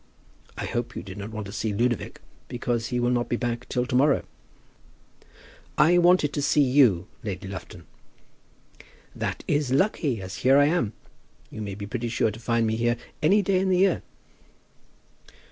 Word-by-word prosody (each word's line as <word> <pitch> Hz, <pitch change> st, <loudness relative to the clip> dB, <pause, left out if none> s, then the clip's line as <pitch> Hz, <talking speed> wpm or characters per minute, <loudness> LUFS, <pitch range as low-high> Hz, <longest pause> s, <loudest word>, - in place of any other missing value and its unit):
I -, -, -3 dB
hope -, -, -3 dB
you -, -, -5 dB
did -, -, -9 dB
not 100 Hz, +2 st, -6 dB
want 110 Hz, -1 st, -6 dB
to 100 Hz, -, -8 dB
see 110 Hz, 0 st, -2 dB
Ludovic, 120 Hz, +2 st, -1 dB, 0.3 s
because 120 Hz, -1 st, -2 dB
he 125 Hz, -, -2 dB
will 120 Hz, 0 st, +1 dB
not 120 Hz, -1 st, 0 dB
be -, -, +1 dB
back 120 Hz, 0 st, -3 dB
till 125 Hz, -1 st, 0 dB
to 125 Hz, -, -3 dB
morrow?" 140 Hz, +2 st, +3 dB, 1.5 s
"I 175 Hz, +3 st, +5 dB
wanted 175 Hz, -4 st, +4 dB
to 145 Hz, -, -1 dB
see 145 Hz, +1 st, +3 dB
you, 125 Hz, -10 st, +4 dB, 0.2 s
Lady 95 Hz, -2 st, -5 dB
Lufton." 95 Hz, -2 st, -9 dB, 1.3 s
"That -, -, -4 dB
is 145 Hz, -3 st, 0 dB
lucky, 140 Hz, -, +1 dB
as 95 Hz, +1 st, -7 dB
here 135 Hz, +2 st, +4 dB
I 145 Hz, -, +6 dB
am. 145 Hz, -, 0 dB, 0.6 s
You 110 Hz, -, -7 dB
may 100 Hz, -2 st, -5 dB
be 100 Hz, 0 st, -6 dB
pretty 120 Hz, +2 st, -3 dB
sure 115 Hz, -1 st, +1 dB
to 110 Hz, -, -10 dB
find 115 Hz, 0 st, +1 dB
me 110 Hz, 0 st, 0 dB
here 120 Hz, +1 st, +1 dB, 0.2 s
any 200 Hz, +7 st, +4 dB
day 190 Hz, 0 st, +2 dB
in 190 Hz, 0 st, 0 dB
the 185 Hz, -, +3 dB
year." 195 Hz, +2 st, +3 dB
120 Hz, 180 wpm, -25 LUFS, 110-145 Hz, 1.5 s, I